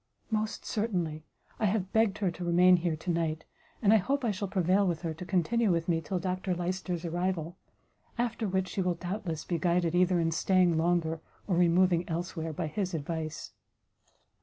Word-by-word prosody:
"Most 215 0 -2
certainly; 175 -8 -2 0.3
I 220 - +1
have 195 -2 0
begged 220 -2 +3
her 195 -4 0
to 175 +1 -7
remain 180 +1 +5
here 170 -2 -1
to 165 +3 -3
night, 160 -2 -1 0.4
and 210 0 +6
I - - +7
hope 270 +7 0
I 225 - +2
shall 200 0 -3
prevail 190 +1 +2
with 170 -1 -2
her 165 -2 -2
to 165 +3 -8
continue 205 +4 +2
with 165 -1 0
me 165 -2 +1
till 185 +4 -3
Dr 185 +1 -2
Lyster's 180 0 -3
arrival; 175 0 -2 0.6
after 235 -2 -1
which 190 -1 0
she 195 - -2
will, 180 -1 +1
doubtless, 175 -2 -4
be 170 -2 -1
guided 175 0 +1
either 180 0 +3
in 165 -1 +1
staying 180 +1 +3
longer, 165 -1 +1 0.2
or 185 - 0
removing 175 0 +3
elsewhere, 165 -1 -3
by 155 - -3
his 180 +3 -2
advice." 160 0 -4
180 Hz, 185 wpm, -30 LUFS, 165-190 Hz, 0.6 s, I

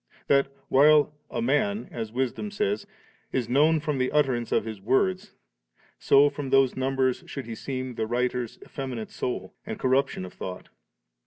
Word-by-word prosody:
that, 140 -1 +3 0.2
while 150 +2 +5 0.2
*a 115 - -2
man,' 120 -4 +1
as 110 -2 -5
Wisdom 130 - -2
says, 105 - -1 0.4
*is 125 -3 -1
known 150 +6 +4
from 150 -3 -2
the 130 0 +1
utterance 130 -6 +1
of - - +2
his 110 -2 -6
wordV 185 - +1 0.7
so 140 +1 +6
from 145 -1 -4
those 135 -1 +4
numbers 130 -1 0
should 135 - -6
be 115 - -6
seen 130 +2 -4
the 110 -1 -2
writer's 125 0 -1
effeminate 125 -5 -5
soul 125 - -4
and - - -5
corruption 130 -6 +1
of 90 - -10
thought'. 90 -1 -7
130 Hz, 160 wpm, -26 LUFS, 120-140 Hz, 0.7 s, so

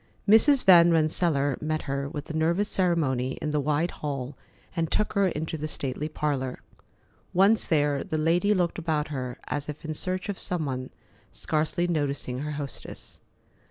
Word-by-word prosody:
Mrs. 250 +6 +6
Van 175 -2 +8
Rensselaer 155 -4 +1
met 155 0 -2
her 140 0 -3
with 150 0 -6
nervous 170 +6 +1
ceremony 145 -9 +1
in 150 - -2
the 150 - +1
wide 150 +4 0
hall 140 -2 -5 0.4
and 165 -2 0
took 210 - 0
her 200 -1 +3
into 160 -1 -3
the 155 - -3
stately 145 +1 -3
parlor. 140 -4 -2 0.7
Once 200 +4 +4
there, 145 -3 +2
the 160 -5 -3
lady 170 +6 +2
looked 175 -2 0
about 155 -3 -1
her 130 -4 -4
as 145 0 -4
if 150 +2 -7
in 155 - -3
search 185 +5 -2
of 200 -2 -4
some 175 -4 -2
one, 130 -2 -4 0.4
scarcely 160 +3 -1
noticing 140 -6 -2
her 150 +2 -4
hostess. 145 -3 -7
155 Hz, 160 wpm, -27 LUFS, 140-175 Hz, 0.7 s, Van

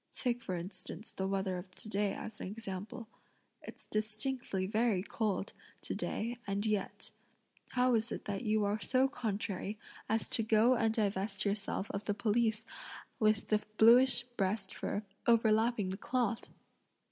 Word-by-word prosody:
Take 245 -2 -1
for 185 -5 -3
instance 185 +4 -7
the 190 - -2
weather 190 -2 -1
of 185 - -10
to - - -8
day 205 -1 0
as 220 -1 -7
an - - -4
example. 210 +2 -6 0.5
It's - - -11
distinctly 215 -1 -1
very 215 -2 +1
cold, 210 -2 -2 0.3
to - - -4
day, 235 +2 -3
and 200 +1 -1
yet, 210 -3 -2 0.6
how 250 0 +4
is 225 +1 +1
it - - -5
that 200 -1 -2
you 215 -2 +2
are 205 +1 0
so 260 +3 +3
contrary 210 -4 -3 0.3
as 220 +1 +1
to - - +1
go 225 +3 +5
and 225 -2 +2
divest 200 -2 0
yourself 200 -1 -1
of 200 +1 -4
the 205 - 0
pelisse 220 +1 +1 0.5
with 215 -1 +2
the 215 -1 +3 0.2
bluish 240 +2 +7
breast 200 -4 -2
fur 205 - -3 0.2
overlapping 225 -2 +4
the 190 - -3
cloth?" 240 0 -1
215 Hz, 155 wpm, -34 LUFS, 200-230 Hz, 0.6 s, bluish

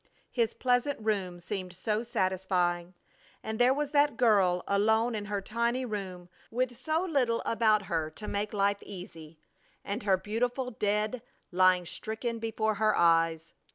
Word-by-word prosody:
His 230 -2 0
pleasant 250 +2 +1
room 195 -5 -1
seemed 185 0 -5
so 210 +4 -1
satisfying! 185 -5 -1 0.5
And 220 0 -4
there 245 +1 +5
was 290 +1 -1
that 290 0 +3
girl 195 -8 +3
alone 220 +4 +2
in 210 -2 -3
her 205 -1 -2
tiny 235 +4 -1
room 190 -5 -5 0.2
with 250 +1 -1
so 315 +6 -1
little 255 -9 +1
about 215 -2 +3
her 165 -4 -2
to 210 +7 -9
make 205 +1 -2
life 200 0 +1
easy, 165 -5 -10 0.5
and 205 +5 -3
her 195 -3 +3
beautiful 245 +6 -2
dead 210 +2 -1 0.3
lying 185 0 +4
stricken 225 +6 -4
before 220 -1 -1
her 215 -1 +3
eyes! 165 -1 +2
210 Hz, 150 wpm, -29 LUFS, 185-235 Hz, 0.5 s, there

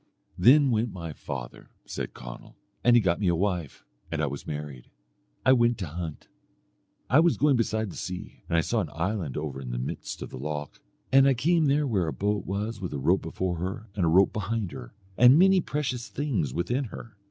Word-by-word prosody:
"Then 135 +8 +6
went 115 0 0
my 85 -4 -6
father," 65 -3 -7 0.2
said - - -5
Conall, - - -10 0.3
"and 120 0 +6
he 120 - +6
got 85 -2 +1
me 100 - 0
a 85 - +3
wife, 90 -5 -2 0.3
and 80 - -2
I 80 - +2
was 70 0 -6
married. 75 -4 -6 0.6
I 130 - +7
went 120 -2 +3
to 95 - -3
hunt. 80 0 -6 0.8
I 135 - +5
was 170 0 +4
going 145 -2 +4
beside 110 -3 0
the - - -11
sea, 90 0 -7
and 85 - +2
I - - +5
saw 115 +6 0
an 85 - -4
island 85 -3 -2
over 70 -3 -4
in 65 - -7
the - - -3
midst 60 +2 -5
of - - -8
the 65 - -7
loch, 75 0 -5 0.3
and 135 0 +6
I 135 - +4
came 160 +5 +2
there 145 +2 +2
where 100 - 0
a 80 - -2
boat 105 +1 -1
was 105 +3 -3
with 90 - -4
a - - -2
rope 85 +8 +2
before 90 +2 -3
her, 95 +5 -5
and 95 - 0
a - - +3
rope 95 +4 +4
behind 105 -2 -2
her, 60 -4 -9 0.3
and 125 +4 +8
many 190 +1 +5
precious 135 -6 -3
things 115 - -2
within 120 - -1
her. 115 -1 -10
95 Hz, 215 wpm, -27 LUFS, 80-120 Hz, 0.8 s, and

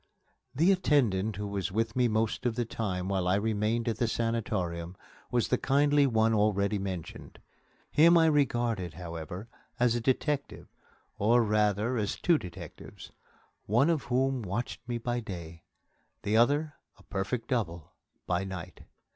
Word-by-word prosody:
The 165 +8 +4
attendant 120 - +2
who 105 +1 -4
was 100 -2 -3
with 115 +3 -1
me 125 -1 +3
most 110 +2 0
of 115 - -1
the 120 - -1
time 95 -5 -3
while 95 -2 0
I 90 - +3
remained 110 +2 0
at 115 -2 0
the 120 - +2
sanatorium 95 -7 -2 0.3
was 120 -2 0
the 125 - +2
kindly 145 +1 +3
one 115 -2 +2
already 105 -1 +2
mentioned. 95 -4 -6 0.5
Him 170 +3 +6
I 165 - +5
regarded, 120 - +1
however, 85 +3 -7 0.3
as 120 -1 +3
a 120 - -1
detective, 140 +3 -1 0.5
or, 115 +4 +4
rather, 105 +2 +1
as 105 -3 -1
two 170 -3 +2
detectives, 85 -2 -10 0.6
one 125 - +3
of 155 -5 -1
whom 130 +1 +1
watched 105 +4 -4
me 120 - -1
by 120 +1 -2
day, 90 -8 -7
and 85 - -15 0.6
the 105 +1 0
other 145 +6 +3 0.2
a - - -19
perfect 100 +5 -3
double 85 - -2 0.3
by 90 +1 0
night. 95 -4 -7
110 Hz, 155 wpm, -29 LUFS, 95-125 Hz, 0.6 s, Him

